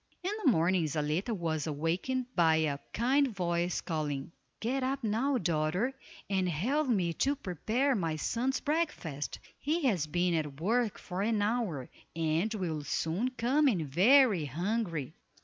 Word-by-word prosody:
In 375 - -1
the 285 - +6
morning 175 -1 +2
Zaletta 155 - -1
was 165 -6 -2
awakened 170 - -1
by 165 -3 +5
a 155 -3 0
kind 270 +5 +3
voice 175 -5 -1
calling, 150 -4 -3 0.3
"Get 255 +4 -1
up 265 +1 -1
now, 235 +6 +1
daughter, 175 +6 0 0.3
and 190 -2 +1
help 255 - 0
me 185 -8 +1
to 275 - +1
prepare 245 - 0
my 165 -8 -1
son's 250 - -1
breakfast, 295 - -2 0.2
he 315 +4 -1
has 190 - +2
been 175 +3 +1
at 150 -4 -2
work 225 +5 +1
for 180 +1 -5
an 210 0 +1
hour, 205 - -1 0.3
and 165 +5 0
will 170 -8 -2
soon 165 - -1
come 270 +6 +3
in 185 - +1
very 200 - +5
hungry." 170 - -2
185 Hz, 150 wpm, -31 LUFS, 160-245 Hz, 0.3 s, the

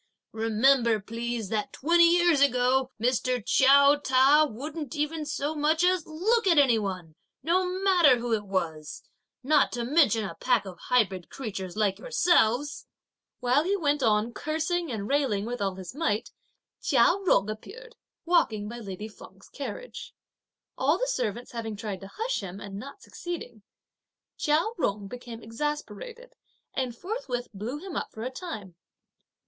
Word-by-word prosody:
Remember 225 +1 +3
please, 230 0 -4
that 215 -1 -2
twenty 340 +4 +4
years 345 -3 +4
ago, 255 -1 +3
Mr. 250 +1 +1
Chiao 280 +2 +6
Ta 285 +2 +4
wouldn't 290 +4 -6
even 300 +1 -2
so 290 +1 -2
much 310 +2 +1
as 365 -2 +2
look 400 +8 +1
at 340 -4 +4
any 255 -6 +5
one, 185 -6 -5 0.3
no 360 +4 +2 0.2
matter 350 -9 +5
who 235 0 -2
it 210 -2 -1
was; 160 -5 -3 0.4
not 290 +1 +3
to 240 0 -2
mention 240 -5 +3
a 190 - -5
pack 240 +5 +1
of 185 -2 -9
hybrid 195 -8 +1
creatures 195 -7 -6
like 205 -3 +1
yourselves!" 295 - +1 0.5
While 250 +4 +3
he 395 +4 0
went 295 -4 0
on 220 0 +2
cursing 320 +2 -2
and 205 -3 -4
railing 260 -8 +1
with 245 0 -4
all 195 -2 -1
his 185 +1 -8
might, 225 -8 -1 0.5
Chia 265 +6 +4
Jung 200 - +4
appeared 475 - -9 0.3
walking 250 -12 +2
by 235 +2 -7
lady 205 -1 -7
Feng's 215 - -15
carriage. - - -7 0.6
All - - +3
the - - -1
servants 245 - -3
having 225 -3 -5
tried 205 -2 -5
to 195 - -8
hush 460 +3 -2
him 195 0 -7
and 200 -1 -7
not 280 - -10
succeeding, 310 -11 -7 0.7
Chia 300 +2 +2 0.2
Jung 200 -6 -1
became 240 +1 -9
exasperated; 300 - -5 0.4
and 255 -3 -2
forthwith 270 - -4
blew 220 +8 -5
him 365 +2 -8
up - - -3
for 220 - -8
a 255 - -3
time. 255 - -7
250 Hz, 155 wpm, -27 LUFS, 215-310 Hz, 0.7 s, Chiao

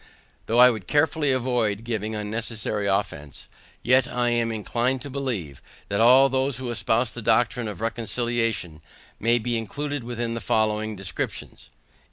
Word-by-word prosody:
Though 115 - +1
I 125 +1 +8
would 110 -6 -7
carefully 150 -1 +2
avoid 120 -5 0
giving 110 -2 -3
unnecessary 105 -1 -3
offence, 75 -9 -3 0.4
yet 130 +1 +4
I 120 -1 0
am 115 -1 +1
inclined 120 +4 -1
to 140 - -7
believe, 120 - -4 0.3
that 100 +1 0
all 130 +4 +7
those 135 -1 0
who 125 -2 -4
espouse 120 0 0
the 120 - -7
doctrine 115 +1 +1
of 105 -5 -7
reconciliation, 115 -6 -2 0.4
may 115 +3 +3
be 120 +1 -2
included 145 +5 -4
within 120 -1 -3
the 115 - -4
following 110 0 0
descriptions. 95 -3 -5
115 Hz, 150 wpm, -24 LUFS, 110-125 Hz, 0.4 s, I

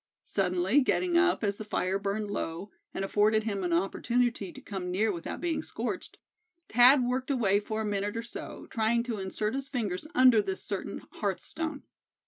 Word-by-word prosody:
Suddenly 190 +6 +2
getting 350 +6 +1
up, 350 -6 +3
as 200 -1 0
the - - -5
fire 195 -2 -1
burned 200 +1 -2
low, 185 0 -4 0.2
and 195 - -3
afforded 215 +2 +3
him 200 -3 -2
an 175 - -1
opportunity 210 +4 0
to - - -11
come 190 -3 -5
near 210 +4 +2
without 170 -3 -5
being 340 -2 -1
scorched, - - -5 0.5
Thad 250 +3 +7
worked 255 +2 -1
away 210 -7 +3
for 215 +1 -3
a - - -2
minute 205 +1 -1
or 230 - -3
so, 235 - -8
trying 230 +1 +2
to 235 -4 -3
insert 210 +3 -2
his 270 0 -4
fingers 220 -2 -2
under 255 -4 +7
this 190 -2 -4
certain 200 -2 -4
hearth 200 -3 -2
stone. 320 -3 -4
215 Hz, 180 wpm, -29 LUFS, 195-245 Hz, 0.5 s, Thad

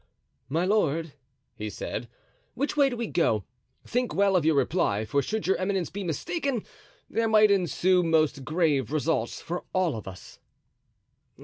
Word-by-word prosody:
"My 165 +6 +1
lord," 165 -6 +1 0.4
he 105 -2 -5
said, 115 +3 -5 0.5
"which 285 +4 -1
way 285 -2 +4
do 245 - -5
we 235 - -2
go? 115 - +1 0.4
Think 245 +1 -1
well 200 -1 +3
of 180 - +3
your 160 0 +3
reply, 135 - +1
for 140 +7 +1
should 220 +8 -3
your 190 - +2
eminence 185 -2 -1
be 200 0 -5
mistaken, 250 - -2 0.4
there 230 0 0
might 215 -1 +6
ensue 185 -1 +3
most 155 -5 +2
grave 150 -5 +1
results 155 -6 -1
for 175 +1 -4
all 185 -6 +1
of 110 - -7
us." 95 -1 -11
170 Hz, 155 wpm, -27 LUFS, 140-205 Hz, 0.5 s, might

